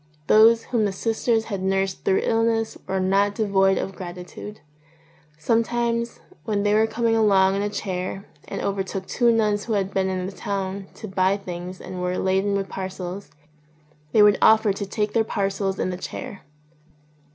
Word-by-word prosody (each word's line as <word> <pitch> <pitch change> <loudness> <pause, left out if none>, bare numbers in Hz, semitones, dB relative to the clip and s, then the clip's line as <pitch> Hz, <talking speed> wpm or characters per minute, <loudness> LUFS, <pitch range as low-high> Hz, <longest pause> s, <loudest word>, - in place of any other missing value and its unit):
Those 225 +4 +6
whom 230 -4 0
the 200 - 0
sisters 225 +2 0
had 200 -4 -4
nursed 195 0 -1
through 190 - +2
illness 225 0 +1
were 190 - -1
not 200 +2 +2
devoid 195 -3 +2
of 195 - -3
gratitude. 180 +3 -8 0.8
Sometimes 235 +5 0 0.2
when 205 -2 -1
they 205 0 +2
were 220 +1 +4
coming 225 +1 0
along 195 -3 +4
in 200 - -1
a 205 - -1
chair 190 -1 -4 0.2
and - - -5
overtook 195 -1 -3
two 240 +3 +2
nuns 210 -2 +1
who 230 - -2
had 195 -2 -1
been 190 -1 +1
in 185 -1 -2
the 190 - -4
town 195 0 -4
to 215 - -8
buy 190 0 +1
things 180 -1 -7
and 180 -1 -7
were 180 0 -1
laden 190 +2 +1
with 195 -1 -1
parcels, 190 0 -6 0.8
they 215 - +6
would 210 -1 +5
offer 220 -2 +5
to 200 0 -5
take 210 +1 -2
their 225 - +3
parcels 195 -2 -2
in 185 - -1
the 180 - -4
chair. 195 +1 -7
200 Hz, 175 wpm, -23 LUFS, 190-220 Hz, 0.8 s, Those